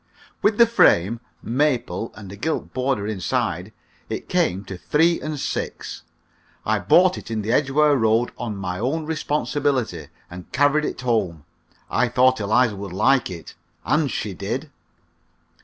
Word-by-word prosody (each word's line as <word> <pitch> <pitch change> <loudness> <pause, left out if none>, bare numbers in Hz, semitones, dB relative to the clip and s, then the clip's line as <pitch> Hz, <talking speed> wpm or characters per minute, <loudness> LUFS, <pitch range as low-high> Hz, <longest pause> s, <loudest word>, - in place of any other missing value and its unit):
With 210 0 +2
the 235 - +8
frame 115 - +3 0.2
(maple, 125 -2 0
and 100 -4 -10
a - - -8
gilt 155 +10 -3
border 130 -5 0
inside) 105 -4 -2 0.4
it - - -5
came 95 +3 +1
to 95 - -6
three 165 - +2
and 155 -1 -4
six. - - -4 0.6
I 110 0 +1
bought 180 - +4
it - - -12
in 110 -2 -2
the 110 - -1
Edgware 145 +3 +3
Road 115 -1 +2
on 115 -4 -5
my 90 -2 -4
own 145 +8 -1
responsibility, 145 -4 -1 0.2
and 90 0 -11
carried 145 +2 +3
it - - -4
home. 100 - -1 0.4
I 125 +2 +1
thought 130 +1 +3
Eliza 110 +2 +2
would 100 -2 -6
like 115 +6 +3
it, 85 -3 -9 0.3
and 150 -1 +2
she 105 -4 -3
did. 120 - -4
120 Hz, 150 wpm, -22 LUFS, 100-145 Hz, 0.6 s, the